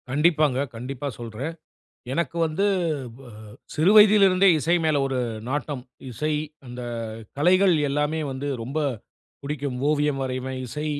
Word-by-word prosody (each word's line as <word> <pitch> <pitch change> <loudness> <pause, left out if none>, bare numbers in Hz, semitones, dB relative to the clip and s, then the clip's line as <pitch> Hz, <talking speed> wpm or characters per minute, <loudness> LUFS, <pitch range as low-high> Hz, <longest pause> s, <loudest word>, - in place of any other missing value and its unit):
கண்டிப்பாங்க, 150 -1 +2 0.2
கண்டிப்பா 130 +4 -5
சொல்றேன், 120 +7 -5 0.6
எனக்கு 170 +3 -2
வந்து, 160 +6 -1 0.5
ப - - -14 0.5
சிறு 155 +5 +3
வயதில் 210 -1 +8
இருந்தே 185 +1 +4
இசை 165 +4 +2
மேல 155 -3 +2
ஒரு 135 -1 -2 0.3
நாட்டம். 145 -1 -3 0.3
இசை 150 +6 -2 0.3
அந்த 125 0 -7 0.5
கலைகள் 185 +5 +4
எல்லாமே 150 +3 0
வந்து 135 +2 -4
ரொம்ப 135 +7 -4 0.6
புடிக்கும். 140 -2 -3
ஓவியம் 150 -2 +1
வரைவேன், 130 0 -4
இசை 150 +6 -5
145 Hz, 125 wpm, -24 LUFS, 130-160 Hz, 0.6 s, வயதில்